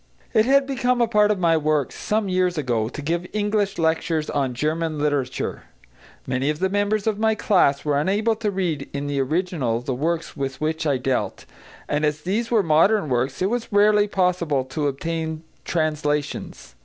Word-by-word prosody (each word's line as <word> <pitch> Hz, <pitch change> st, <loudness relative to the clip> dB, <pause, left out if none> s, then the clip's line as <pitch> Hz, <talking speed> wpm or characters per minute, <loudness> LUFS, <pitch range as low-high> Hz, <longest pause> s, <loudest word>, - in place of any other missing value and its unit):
It 220 Hz, -2 st, +4 dB
had 275 Hz, +1 st, +4 dB
become 250 Hz, -2 st, 0 dB
a 235 Hz, -, +3 dB
part 210 Hz, -2 st, +3 dB
of 210 Hz, -, +2 dB
my 170 Hz, -2 st, +3 dB
work, 155 Hz, -3 st, +1 dB
some 215 Hz, -1 st, -1 dB
years 185 Hz, -2 st, +1 dB
ago, 120 Hz, -6 st, 0 dB
to 145 Hz, -, -7 dB
give 170 Hz, +4 st, -1 dB
English 205 Hz, -1 st, 0 dB
lectures 160 Hz, -1 st, 0 dB
on 135 Hz, -4 st, -1 dB
German 155 Hz, +3 st, -1 dB
literature. 145 Hz, -3 st, -2 dB, 0.6 s
Many 130 Hz, +3 st, -1 dB
of 150 Hz, -, -1 dB
the 190 Hz, +3 st, 0 dB
members 205 Hz, +1 st, 0 dB
of 215 Hz, -2 st, 0 dB
my 220 Hz, 0 st, +2 dB
class 165 Hz, -10 st, +2 dB
were 145 Hz, -1 st, +2 dB
unable 210 Hz, +8 st, +1 dB
to 215 Hz, -2 st, -1 dB
read 175 Hz, -8 st, -2 dB
in 140 Hz, 0 st, -3 dB
the 140 Hz, -1 st, -1 dB
original 150 Hz, -5 st, -1 dB
the 125 Hz, +2 st, -3 dB
works 165 Hz, +6 st, -2 dB
with 135 Hz, -2 st, -4 dB
which 160 Hz, +1 st, -1 dB
I 140 Hz, -2 st, +2 dB
dealt, 130 Hz, 0 st, -2 dB, 0.4 s
and 145 Hz, +1 st, -1 dB
as 150 Hz, 0 st, 0 dB
these 215 Hz, +7 st, -1 dB
were 225 Hz, -4 st, +3 dB
modern 165 Hz, +3 st, +3 dB
works 130 Hz, +6 st, -1 dB
it 190 Hz, -, +2 dB
was 240 Hz, -1 st, -3 dB
rarely 210 Hz, 0 st, +4 dB
possible 180 Hz, -8 st, +1 dB
to 140 Hz, +3 st, -2 dB
obtain 160 Hz, +2 st, -3 dB, 0.2 s
translations. 150 Hz, -, -2 dB
160 Hz, 180 wpm, -23 LUFS, 145-205 Hz, 0.6 s, It